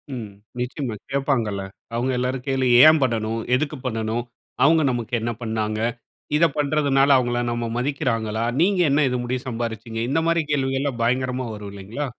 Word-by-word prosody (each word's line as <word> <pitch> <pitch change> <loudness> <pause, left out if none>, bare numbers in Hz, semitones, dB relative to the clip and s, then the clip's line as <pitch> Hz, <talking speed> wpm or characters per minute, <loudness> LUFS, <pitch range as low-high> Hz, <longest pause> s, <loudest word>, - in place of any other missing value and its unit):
ம். 115 -4 -6 0.3
நிச்சயமா, 125 -1 -3 0.2
கேட்பாங்கள்ல! 120 -8 0 0.3
அவுங்க 125 +3 0
எல்லாரும் 125 +1 -2
கேள்வி 135 -2 +1 0.2
ஏன் 155 -1 +7
பண்ணனும்? 115 -2 -1
எதுக்கு 150 +3 -1
பண்ணணும்? 115 -1 -1 0.4
அவுங்க 160 +2 +5
நமக்கு 120 -2 -4
என்னா 115 +1 -2
பண்ணாங்க? 110 -1 -2 0.6
இத 160 +3 +5
பண்ணுறதனால 140 -2 +3
அவுங்கள்லாம் 120 -1 +1
நம்ம 120 0 -2
மதிக்கிறாங்களா? 120 -5 -1 0.2
நீங்க 190 +2 +3
என்னா 140 +2 +3
இது 125 - -1
முடிய 125 +1 -2
சம்பாரீச்சிங்க? 115 -1 -4
இந்த 145 +4 +2
மாரி 170 0 +3
கேள்விகள்லாம் 135 -2 0
பயங்கரமா 125 +1 0
வரும் 105 -1 -8
இல்லீங்களா? 100 +9 -5
125 Hz, 150 wpm, -23 LUFS, 115-140 Hz, 0.6 s, ஏன்